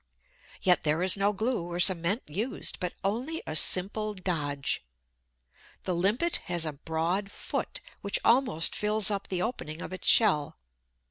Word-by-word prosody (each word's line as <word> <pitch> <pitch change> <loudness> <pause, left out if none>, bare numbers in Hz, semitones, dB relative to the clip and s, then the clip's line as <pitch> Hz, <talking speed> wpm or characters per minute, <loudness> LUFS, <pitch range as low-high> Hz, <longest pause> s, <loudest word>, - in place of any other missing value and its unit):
Yet 180 -2 +3
there 155 +3 0
is 185 0 +7
no 200 +1 +1
glue 215 -3 -2
or 175 0 -5
cement 185 +4 +2
used, 210 - -2
but 180 -1 -4
only 250 +12 -3
a 155 - -5
simple 210 +6 +2
dodge. 150 - -2 1.0
The 185 - -2
Limpet 205 - +1
has 175 -2 -1
a 155 - -4
broad 165 +7 -3
"foot," - - -4 0.2
which 200 - +2
almost 230 - +3
fills 210 0 +3
up 200 -1 -3
the 180 -1 -2
opening 165 -9 -5
of 180 - -7
its 185 - -7
shell. 155 -11 +3
185 Hz, 150 wpm, -28 LUFS, 170-210 Hz, 1.0 s, is